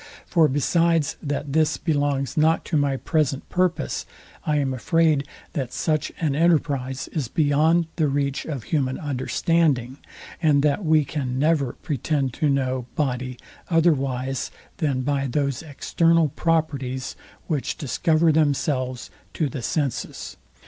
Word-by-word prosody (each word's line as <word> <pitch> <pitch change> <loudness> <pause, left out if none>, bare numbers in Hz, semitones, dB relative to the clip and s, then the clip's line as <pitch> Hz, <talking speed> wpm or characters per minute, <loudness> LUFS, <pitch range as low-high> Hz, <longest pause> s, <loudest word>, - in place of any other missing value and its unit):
For 165 -3 +4
besides 165 +2 +2
that 145 -1 -3
this 155 0 +2
belongs 145 -3 0
not 160 +1 +3
to 165 - -2
my 140 -2 +2
present 145 -2 0
purpose, 175 -4 0 0.4
I 150 -1 +2
am 135 -2 0
afraid, 155 +2 +2 0.3
that 130 -4 -3
such 155 -2 -1
an 155 -4 +1
enterprise 140 -5 +1
is 150 -7 -2
beyond 160 +3 +3
the 155 -3 +2
reach 140 0 -1
of 140 -7 -4
human 130 -2 -1
understanding, 145 -1 0 0.4
and 145 -3 +4
that 150 +6 +1
we 155 -2 +3
can 130 -3 -3
never 145 -3 +2
pretend 140 -2 -1
to 150 - +3
know 130 -2 0
body 130 -3 -2 0.3
otherwise 135 -6 +1 0.3
than 145 -8 0
by 140 +1 0
those 140 0 -1
external 165 +1 +2
properties, 135 -5 -1 0.3
which 150 -6 -2
discover 160 +4 +2
themselves 140 -4 0 0.2
to 155 -4 0
the 130 - -5
senses. 140 0 -3
145 Hz, 130 wpm, -24 LUFS, 135-160 Hz, 0.4 s, For